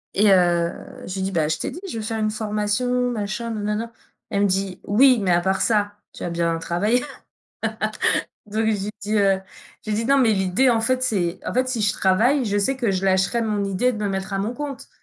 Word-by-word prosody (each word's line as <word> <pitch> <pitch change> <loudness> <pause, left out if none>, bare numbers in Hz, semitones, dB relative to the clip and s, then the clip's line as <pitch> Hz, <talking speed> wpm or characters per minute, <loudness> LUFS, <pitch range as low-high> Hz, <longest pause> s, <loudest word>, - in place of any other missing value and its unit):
et 205 +1 +5
heu, 175 -2 +3 0.3
je 185 - -5
lui 190 - -3
dis: 195 - -2
«Bah, 160 -4 +1
je 160 - 0
t'ai - - -3
dit 355 - -9
je 230 - -5
veux 220 - -4
faire 220 0 -3
une 215 0 0
formation, 220 +4 0
machin, 230 +1 -3
nanana». 210 +2 -2 0.4
Elle 200 0 +1
me - - +4
dit: 190 -1 -1
«Oui, 250 +3 +5
mais 185 - +1
à 175 0 +4
part 190 +1 0
ça, 205 -2 +1 0.2
tu - - -9
vas 175 - -2
bien 170 -1 0
travailler?» 205 +9 0 1.4
Donc 215 +2 -1
je 220 - +3
lui 205 0 -2
dis, 210 +1 -2
heu, 195 -1 +3 0.4
je 215 - -5
lui 210 - +1
dis: 225 - -1
«Non, 275 0 +4
mais 240 -4 +4
l'idée, 190 +6 +2
en 230 -2 +2
fait 255 +2 +1
c'est» 190 -9 -1
en - - -3
fait, 255 +1 +1
si 250 -3 -2
je 200 -2 +2
travaille, 235 +9 +3
je 205 -1 0
sais 265 +7 +1
que 235 -6 0
je 190 0 -1
lâcherai 190 +5 +2
mon 210 -2 -1
idée 200 +6 +1
de 220 - -6
me 210 -1 -1
mettre 195 0 -3
à - - 0
mon 205 +4 -1
compte. 285 -1 -6
210 Hz, 240 wpm, -22 LUFS, 190-235 Hz, 1.4 s, et